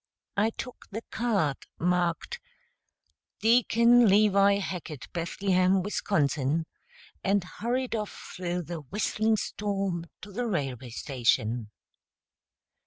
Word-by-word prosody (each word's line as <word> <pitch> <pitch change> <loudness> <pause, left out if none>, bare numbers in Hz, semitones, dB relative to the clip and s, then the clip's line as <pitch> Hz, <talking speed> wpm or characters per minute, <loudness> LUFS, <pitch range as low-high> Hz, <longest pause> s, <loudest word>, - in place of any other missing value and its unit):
I 210 +2 +3
took 250 +2 -8
the 220 +3 -5
card, 200 - 0
marked 175 -1 0 1.0
"Deacon 235 +1 +5
Levi 200 0 +5
Hackett, 175 -7 -6
Bethlehem, 185 +2 +2
Wisconsin," 160 -6 0 0.6
and 195 -1 +2
hurried 240 +7 -2
off 215 -2 -5
through 180 -1 -2
the 170 +1 -5
whistling 215 +8 0
storm 195 -5 -2 0.2
to 205 - -9
the 240 +5 -2
railway 135 - -2
station. 120 -3 0
190 Hz, 100 wpm, -28 LUFS, 165-215 Hz, 1.0 s, Deacon